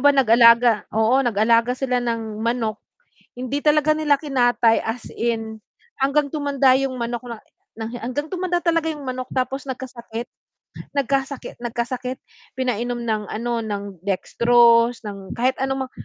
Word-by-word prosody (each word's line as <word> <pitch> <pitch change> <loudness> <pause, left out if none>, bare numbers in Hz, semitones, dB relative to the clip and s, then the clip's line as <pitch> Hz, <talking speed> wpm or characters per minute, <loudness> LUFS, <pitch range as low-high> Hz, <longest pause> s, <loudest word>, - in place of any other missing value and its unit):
ba 285 - +6
nag-alaga 235 -1 +6 0.2
oo, 220 +3 +2
nag-aalaga 230 +1 +2
sila 250 -2 0
ng 225 -2 -3
manok. 230 -2 -1 0.5
Hindi 255 +3 -4
talaga 305 0 +4
nila 295 -2 +2
kinatay, 245 -5 +2
as 225 +1 -4
in. 225 -2 -2 0.4
Hanggang 280 +2 +1
tumanda 280 -3 +2
'yong 270 -1 -1
manok 240 +1 -3
na 235 -2 -7 0.4
na 225 - -5
hi 240 - -6
hanggang 255 +6 -3
tumanda 360 -1 -1
talaga 330 -2 +1
'yong 300 - -9
manok. 255 0 -4
Tapos 260 +1 -2
nagkasakit. 245 -3 -7 0.7
Nagkasakit 275 0 -2
nagkasakit. 245 +2 -4 0.4
Pinainom 245 -1 -1
ng, 220 -2 -1
ano, 235 +2 -2
ng 200 -4 -6
dextrose 235 +4 +3
ng 195 -2 -7
kahit 255 +2 +1
ano 265 0 -1
mang - - -23
245 Hz, 140 wpm, -22 LUFS, 230-270 Hz, 0.7 s, ba